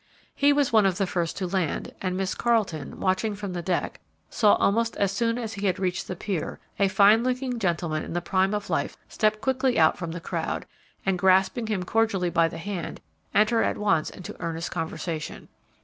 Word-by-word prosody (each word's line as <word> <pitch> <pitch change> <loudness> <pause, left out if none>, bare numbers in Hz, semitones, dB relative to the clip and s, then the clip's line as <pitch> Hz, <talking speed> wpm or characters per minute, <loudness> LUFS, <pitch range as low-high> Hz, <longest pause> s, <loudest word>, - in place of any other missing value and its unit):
He 285 0 +4
was 285 -4 +2
one 215 -3 +6
of 185 -2 0
the 195 - +1
first 175 -3 -2
to 190 - -2
land, 180 -4 -2
and 185 -1 -1
Miss 190 0 -1
Carleton, 210 - 0
watching 195 +3 0
from 200 -2 -5
the 175 - -3
deck, 175 0 -2 0.3
saw, 210 -3 +5
almost 230 +3 +1
as 200 -1 +1
soon 230 +3 0
as 225 -3 -4
he 200 -1 -2
had 185 - +1
reached 180 -2 -2
the 185 - -4
pier, 180 -2 -3 0.2
a 200 - +4
fine 205 +4 +5
looking 255 -1 -1
gentleman 170 -5 -1
in - - -6
the 175 - 0
prime 190 +3 +1
of 205 -1 -4
life - - -1
step 215 -1 +1
quickly 260 -1 +1
out 160 -1 +4
from, 170 -2 -4
the 170 - -5
crowd, 165 - -3 0.4
and, 190 -2 +1
grasping 190 +5 +3
him 205 -4 -1
cordially 195 -3 +1
by 165 0 +4
the - - -7
hand, 180 -1 -5 0.4
enter 215 +2 +4
at - - 0
once 165 -7 +1
into 180 - -9
earnest 165 0 -3
conversation. 160 -1 -4
195 Hz, 200 wpm, -26 LUFS, 175-220 Hz, 0.4 s, one